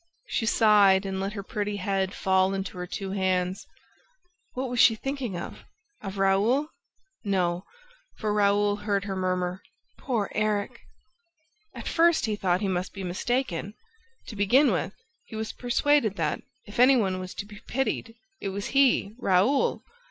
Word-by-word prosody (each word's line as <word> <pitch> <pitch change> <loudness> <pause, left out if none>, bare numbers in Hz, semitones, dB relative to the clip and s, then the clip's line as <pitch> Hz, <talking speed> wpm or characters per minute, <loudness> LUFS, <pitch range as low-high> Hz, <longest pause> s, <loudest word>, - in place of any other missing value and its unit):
She 225 - -2
sighed 205 -4 +5
and 190 -1 -3
let 195 +2 -3
her 200 -2 -5
pretty 205 0 -3
head 195 -1 -1
fall 190 0 +2
into 195 -1 -4
her 180 - -4
two 195 +1 -5
hands. 185 -1 -1 0.9
What 260 +1 -3
was 245 -1 -3
she 225 - +7
thinking 260 -5 -4
of? 170 - -8 0.4
Of 195 -1 -6
Raoul? 205 +10 +2 0.5
No, 180 -3 0 0.5
for 215 -1 -2
Raoul 205 0 +2
heard 205 -1 -1
her 200 -1 -4
murmur: 185 0 -1 0.4
"Poor 230 -7 -2
Erik!" 215 +2 -1 1.0
At - - -7
first, 335 -5 +3
he 215 -2 -1
thought 185 -2 0
he 200 - 0
must 185 -1 -2
be 195 - -5
mistaken. 200 0 -2 0.5
To 220 - -9
begin 240 +7 +4
with, 190 +2 -2 0.3
he - - -10
was 220 0 -3
persuaded 245 -2 +1
that, - - -1 0.2
if 205 +2 -9
any 255 +2 +7
one 190 -5 0
was 185 0 -7
to 200 - -5
be 210 0 -12
pitied, 230 -3 -2 0.2
it 200 - -3
was 200 +1 -4
he, 270 -7 +3
Raoul. 200 +9 +2
205 Hz, 160 wpm, -26 LUFS, 190-225 Hz, 1.0 s, she